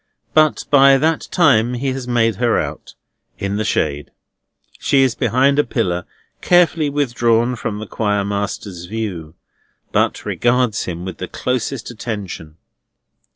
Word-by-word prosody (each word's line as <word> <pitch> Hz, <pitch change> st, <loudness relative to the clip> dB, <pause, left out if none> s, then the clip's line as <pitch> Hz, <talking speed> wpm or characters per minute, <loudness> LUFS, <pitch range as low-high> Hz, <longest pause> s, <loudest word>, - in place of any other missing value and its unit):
But 155 Hz, -1 st, +3 dB
by 135 Hz, -1 st, +7 dB
that 160 Hz, +3 st, 0 dB
time 125 Hz, -9 st, +3 dB
he 135 Hz, +3 st, -2 dB
has 130 Hz, -1 st, -5 dB
made 115 Hz, -4 st, +1 dB
her 120 Hz, 0 st, +2 dB
out, -, -, -6 dB, 0.4 s
in 100 Hz, +1 st, -2 dB
the 110 Hz, -, -1 dB
shade. 75 Hz, -8 st, -1 dB, 0.7 s
She 135 Hz, -1 st, +3 dB
is 130 Hz, -3 st, +2 dB
behind 130 Hz, +5 st, +2 dB
a -, -, +5 dB
pillar, 90 Hz, -11 st, -2 dB, 0.4 s
carefully 170 Hz, -4 st, +3 dB
withdrawn 120 Hz, -4 st, +1 dB
from 110 Hz, -2 st, -4 dB
the 110 Hz, -, -6 dB
Choir 105 Hz, -1 st, -1 dB
master's 100 Hz, -3 st, -4 dB
view, 90 Hz, -6 st, -5 dB, 0.6 s
but -, -, 0 dB
regards 120 Hz, -2 st, +1 dB
him 90 Hz, 0 st, -5 dB
with 95 Hz, -3 st, -7 dB
the -, -, -4 dB
closest 125 Hz, 0 st, -3 dB
attention. 100 Hz, -9 st, -6 dB
115 Hz, 140 wpm, -19 LUFS, 100-135 Hz, 0.7 s, by